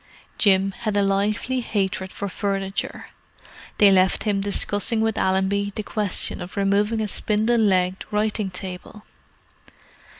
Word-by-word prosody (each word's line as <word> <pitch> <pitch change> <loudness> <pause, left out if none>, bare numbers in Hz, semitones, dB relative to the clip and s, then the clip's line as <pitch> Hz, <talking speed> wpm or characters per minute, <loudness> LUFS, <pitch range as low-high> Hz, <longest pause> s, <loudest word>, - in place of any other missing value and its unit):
Jim 195 -1 +4
had 215 -2 -1
a 200 - +3
lively 210 +6 0
hatred 195 -4 -2
for 200 - -5
furniture; 195 0 -3 0.7
they 205 -1 +6
left 185 -1 +3
him 205 -2 0
discussing 205 +2 0
with 220 0 +1
Allenby 195 +1 0
the 215 - -3
question 205 -3 -1
of 180 +3 -8
removing 205 +3 +1
a 215 - -1
spindle 220 +4 +1
legged 185 -3 +1
writing 210 -1 -1
table. 185 +3 -7
200 Hz, 130 wpm, -23 LUFS, 190-215 Hz, 0.7 s, they